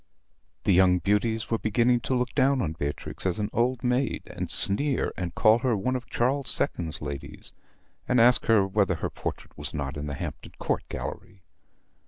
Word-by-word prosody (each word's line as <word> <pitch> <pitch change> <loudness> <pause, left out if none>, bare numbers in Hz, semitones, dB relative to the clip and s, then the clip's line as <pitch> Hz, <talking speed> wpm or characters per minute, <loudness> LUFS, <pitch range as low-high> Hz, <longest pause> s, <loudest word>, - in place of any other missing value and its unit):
The - - +2
young 90 0 +5
beauties 110 +4 0
were 115 - +1
beginning 120 +3 +2
to 130 - +2
look 125 0 -1
down 135 0 +3
on 80 - -2
Beatrix 75 -2 -5
as 95 -2 0
an 105 -1 -2
old 120 +1 0
maid, 125 +1 0
and - - -6
sneer, 135 +7 +2
and 90 -2 -4
call 110 +2 +5
her 125 -3 +1
one 130 +7 -1
of 125 -1 -5
Charles 130 +1 +1
II.'s 80 -3 -2
ladies, 70 -2 -7 0.5
and 125 - +3
ask 120 +2 +5
whether 100 -3 +3
her 80 - -4
portrait - - -6
was 70 +1 -5
not 70 0 -3
in 75 +1 -4
the 70 - -4
Hampton - - -7
Court - - -1
Gallery? 90 0 -7
110 Hz, 180 wpm, -27 LUFS, 90-125 Hz, 0.5 s, young